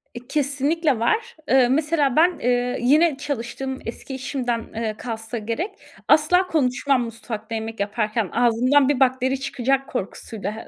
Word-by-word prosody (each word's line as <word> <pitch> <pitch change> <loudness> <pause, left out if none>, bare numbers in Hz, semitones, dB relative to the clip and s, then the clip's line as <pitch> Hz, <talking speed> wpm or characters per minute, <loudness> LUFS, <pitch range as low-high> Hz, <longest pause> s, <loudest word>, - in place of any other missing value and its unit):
E, 245 +1 -9
kesinlikle 290 0 0
var. 440 - 0
Eee, 260 -2 +5
mesela 290 -1 +1
ben, 345 +3 +4
eee, 245 0 0
yine 295 +3 +4
çalıştığım 265 -1 -4
eski 250 +3 -6
işimden 235 -4 -3
kalsa 225 0 -5
gerek, 230 - -3 0.4
asla 360 +5 +4
konuşmam 270 -4 +1
mutfakta 225 -1 -6
yemek 225 0 -5
yaparken. 210 0 -1
Ağzımdan 250 +4 +3
bir 280 -2 +1
bakteri 260 0 +2
çıkacak 270 +1 -1
korkusuyla. 215 -1 -5
255 Hz, 130 wpm, -23 LUFS, 230-285 Hz, 0.4 s, Eee